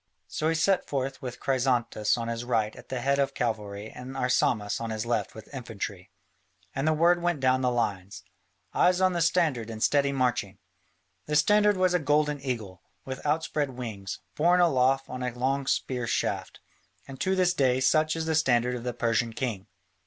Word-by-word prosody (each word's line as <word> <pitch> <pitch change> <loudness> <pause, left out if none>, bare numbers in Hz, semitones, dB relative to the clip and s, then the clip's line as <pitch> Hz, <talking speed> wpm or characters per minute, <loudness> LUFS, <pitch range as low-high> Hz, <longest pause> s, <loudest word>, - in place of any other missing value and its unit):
So 155 - -1
he 165 - +1
set 185 +4 +2
forth 135 -1 -2
with 125 -1 -6
Chrysantas 125 -5 +1
on 115 -1 -3
his 115 0 -3
right 115 -3 0
at - - -14
the 130 -2 -3
head 140 +2 +1
of 140 - 0
cavalry 105 -3 -3
and 130 +2 -8
Arsamas 120 -5 +1
on 115 - -3
his 110 0 -3
left 115 -5 -1
with 110 +5 -12
infantry. 105 -7 -6 0.6
And 135 +3 -1
the 155 - +4
word 170 +3 +3
went 175 -3 0
down 130 0 +2
the 125 - +2
lines, 100 -6 -2 0.5
"Eyes 180 0 +3
on 185 -1 +3
the 170 - -1
standard 160 -9 +1
and 110 -1 -4
steady 140 -1 +3
marching." 120 -7 -1 0.7
The 150 - -1
standard 210 +5 +4
was 185 -1 +2
a 180 - +3
golden 150 -1 +1
eagle, 110 -9 -4 0.2
with 130 0 -6
outspread 150 -3 -1
wings, 105 -5 -5 0.2
borne 175 +4 +3
aloft 135 -5 +3
on 125 0 -6
a 125 -1 -3
long 135 +2 0
spear 125 -3 -1
shaft, 100 - -2 0.5
and 135 -1 -9
to 190 0 +1
this 180 -1 +3
day 130 -5 +2
such 155 +4 +3
is 165 -1 -2
the 160 - 0
standard 125 -5 +2
of 120 -1 -5
the 125 0 -3
Persian 115 -1 0
king. 110 -5 -3
130 Hz, 190 wpm, -27 LUFS, 115-150 Hz, 0.7 s, the